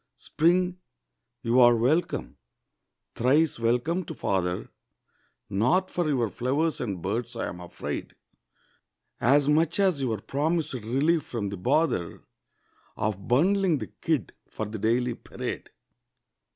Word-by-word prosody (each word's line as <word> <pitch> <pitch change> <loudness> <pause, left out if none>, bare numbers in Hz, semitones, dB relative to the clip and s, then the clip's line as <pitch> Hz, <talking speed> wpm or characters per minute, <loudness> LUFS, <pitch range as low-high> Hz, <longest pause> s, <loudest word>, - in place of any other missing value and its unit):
Spring, 180 +3 +1 0.6
you 120 +2 +3
are 120 -1 +7
welcome, 135 +10 0 0.8
thrice 140 +4 +2
welcome 125 +10 +1
to 160 - -8
father; 90 -5 -1 0.8
Not 125 - +1
for 175 -3 0
your 125 -6 +1
flowers 140 +6 0
and 100 -8 -4
birds, 115 +5 -2
I'm 90 - -4
afraid, 90 - -6 1.0
As 140 +3 +4
much 160 +4 +2
as 185 -8 +3
your 115 -5 0
promised 150 - -1
relief 135 +8 +1
from 115 -8 -4
the 100 - -5
bother 95 - 0 0.7
Of 100 -2 -2
bundling 180 +6 +3
the - - -7
kid 155 -8 0 0.2
for 110 - -4
the 110 +1 -6
daily 120 +3 +1
parade. - - -6
130 Hz, 120 wpm, -27 LUFS, 110-160 Hz, 1.0 s, are